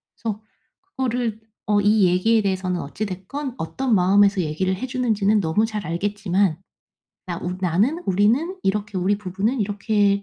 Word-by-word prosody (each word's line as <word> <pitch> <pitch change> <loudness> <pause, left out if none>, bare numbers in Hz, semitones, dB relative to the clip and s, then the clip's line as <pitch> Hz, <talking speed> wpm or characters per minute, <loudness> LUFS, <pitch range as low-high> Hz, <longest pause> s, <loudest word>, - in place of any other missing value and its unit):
그래서 215 -1 -4 0.6
그거를 240 -4 -1 0.3
어 205 -1 +3
이 205 0 +4
얘기에 215 +6 +3
대해서는 185 -2 -1
어찌 175 +9 -4
됐건 235 +9 -6
어떤 245 +7 -1
마음에서 200 +2 +4
얘기를 180 +4 -1
해 220 - -4
주는지는 220 -5 +1
너무 180 +6 +1
잘 215 -3 -5
알겠지만 195 0 0 0.7
나 175 -2 -3
우 180 +1 -3
나는, 200 - +1
우리는, 230 - +2
이렇게 205 0 -1
우리 195 +3 +1
부부는 210 +6 -1
이렇게 205 0 +1
205 Hz, 340 characters per minute, -22 LUFS, 185-220 Hz, 0.7 s, 이